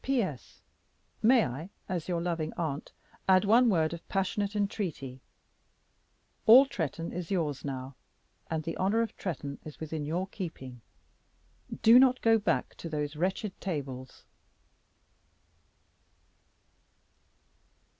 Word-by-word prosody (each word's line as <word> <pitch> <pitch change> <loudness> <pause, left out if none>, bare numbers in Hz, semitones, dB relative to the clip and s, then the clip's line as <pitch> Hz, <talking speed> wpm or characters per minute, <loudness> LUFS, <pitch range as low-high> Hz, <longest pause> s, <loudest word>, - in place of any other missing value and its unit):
"P.S. 215 - -2 0.6
May 240 +1 +5
I 145 +9 -6 0.2
as 175 -4 -3
your 175 -2 -1
loving 165 -3 -2
aunt 155 -4 -3 0.4
add 185 +1 +5
one 235 +4 +5
word 160 -5 +2
of 170 - -9
passionate 200 +2 -1
entreaty? 175 - -3 1.3
All 250 +5 +10
Tretton 165 - -4
is 175 -2 -5
yours 160 -8 -1
now, 135 -1 -5 0.6
and 160 -1 -2
the 165 +1 -4
honor 210 +5 +2
of 225 - -6
Tretton 145 -6 -5
is 155 - -10
within 160 -1 -4
your 170 +5 -1
keeping. 145 - -8 1.0
Do 230 +3 +9
not 255 -1 +5
go 225 -1 +5
back 205 - 0
to 165 - -7
those 150 -1 -3
wretched 190 +5 -1
tables!" 135 -7 -5
170 Hz, 115 wpm, -30 LUFS, 150-205 Hz, 1.3 s, All